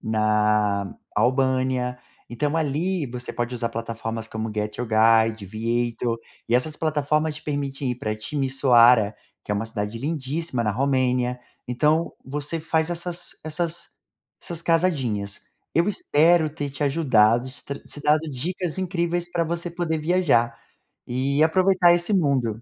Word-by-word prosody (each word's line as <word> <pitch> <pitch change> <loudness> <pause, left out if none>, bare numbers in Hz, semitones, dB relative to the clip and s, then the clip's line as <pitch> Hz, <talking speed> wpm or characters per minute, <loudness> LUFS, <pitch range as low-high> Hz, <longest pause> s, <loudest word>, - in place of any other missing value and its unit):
na 105 -2 +1 0.2
Albânia. 130 -1 +1 0.3
Então 145 +6 -1
ali, 160 +3 0
você 125 0 -6
pode 120 +1 -3
usar 115 0 -1
plataformas 115 0 -5
como 110 0 -4
Get 105 0 -3
your 125 - -2
Guide, 110 -1 +4
Viator, 115 +3 -1 0.3
e 115 - +2
essas 150 +5 +1
plataformas 155 0 0
te 150 - -10
permitem 140 -2 -2
ir 125 - -3
para 110 -3 -3
Timisoara, 125 -3 +4 0.3
que - - -8
é - - +2
uma 105 +2 -2
cidade 110 0 -4
lindíssima 145 0 -2
na 105 - +1
Romênia. 125 0 0 0.3
Então 150 +7 +1
você 145 +4 -3
faz 160 0 0
essas 175 0 -4
essas 165 +2 -3 0.5
essas 170 -2 -4
casadinhas. 130 - 0 0.3
Eu 170 +3 +3
espero 165 -4 +3
ter 145 -2 -4
te 140 - -5
ajudado, 125 -5 +3
te 140 - -12
tra 140 0 -5
te 145 - -11
dado 150 +2 +2
dicas 170 +6 -3
incríveis 175 -1 -1
para 170 -1 0
você 170 +1 -3
poder 165 -2 -2
viajar, 150 -9 +2 0.5
e 135 +4 0
aproveitar 180 +1 +4
esse 175 +4 0
mundo. 130 - +1
135 Hz, 145 wpm, -24 LUFS, 115-160 Hz, 0.5 s, Guide